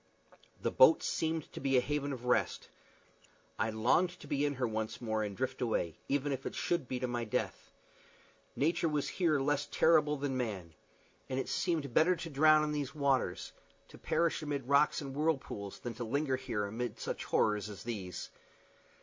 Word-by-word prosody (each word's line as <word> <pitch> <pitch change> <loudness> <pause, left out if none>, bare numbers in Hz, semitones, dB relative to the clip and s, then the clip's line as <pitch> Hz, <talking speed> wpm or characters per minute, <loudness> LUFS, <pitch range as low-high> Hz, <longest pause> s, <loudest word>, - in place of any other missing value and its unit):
The - - -1
boat - - +6
seemed 160 -1 -2
to - - -6
be 135 -1 +2
a - - +7
haven 145 +2 -1
of 125 -2 -6
rest. 125 - +1 0.9
I 110 - +1
longed 120 +11 +3
to - - -10
be 145 +1 0
in 145 - -2
her 125 -1 0
once 110 0 -3
more, 110 -2 -1
and 105 -2 -4
drift 130 0 -3
away, 110 -9 0
even 140 +1 +1
if 135 -1 -3
it - - -6
should 170 -7 -1
be 125 - -3
to 125 - 0
my 120 -1 -2
death. 110 - -3 0.9
Nature 165 +3 +1
was 150 -2 -1
here 165 -6 +2
less 145 +1 0
terrible 155 -2 +4
than 140 -1 -2
man; 100 -10 -3 0.6
and 130 0 -1
it 130 - -3
seemed 155 -8 -1
better 180 +7 +5
to 165 -1 -7
drown 155 +2 +5
in 150 - -1
the 145 -2 -1
waters, 135 -10 0 0.4
to - - -14
perish 170 -1 +1
amid 145 -4 -3
rocks 140 +3 +4
and 135 -2 -6
whirlpools, 140 -10 -2
than 120 - -5
to 120 +2 -5
linger 135 +3 0
here 125 -6 -2
amid 115 +4 -4
such - - -4
horrors 105 -1 +1
as 100 -5 -9
these. 100 -7 -5
135 Hz, 185 wpm, -33 LUFS, 115-150 Hz, 0.9 s, a